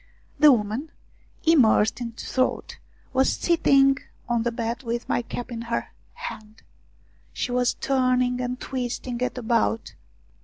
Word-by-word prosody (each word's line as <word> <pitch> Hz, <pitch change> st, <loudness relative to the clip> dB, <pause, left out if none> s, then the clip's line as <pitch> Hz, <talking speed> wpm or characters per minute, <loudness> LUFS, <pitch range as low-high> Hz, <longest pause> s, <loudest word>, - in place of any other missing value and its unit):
The 300 Hz, -1 st, +8 dB
woman, 230 Hz, +5 st, 0 dB, 0.5 s
immersed 245 Hz, -8 st, +4 dB
in 230 Hz, -1 st, -4 dB
thought, 255 Hz, +2 st, -2 dB, 0.3 s
was 265 Hz, +1 st, +3 dB
sitting 275 Hz, -5 st, +3 dB, 0.3 s
on 240 Hz, -2 st, +1 dB
the 240 Hz, +1 st, 0 dB
bed 230 Hz, +1 st, -3 dB
with 235 Hz, -1 st, -3 dB
my -, -, +1 dB
cap 245 Hz, +1 st, -6 dB
in 230 Hz, -1 st, -4 dB
her 235 Hz, 0 st, -3 dB, 0.2 s
hand. 220 Hz, -, -9 dB, 0.7 s
She 250 Hz, -, -3 dB
was 245 Hz, 0 st, +1 dB
turning 255 Hz, -2 st, +1 dB
and 250 Hz, 0 st, -3 dB
twisting 245 Hz, -1 st, -4 dB
it 250 Hz, -, -1 dB
about. 220 Hz, -, 0 dB
245 Hz, 130 wpm, -25 LUFS, 230-260 Hz, 0.7 s, The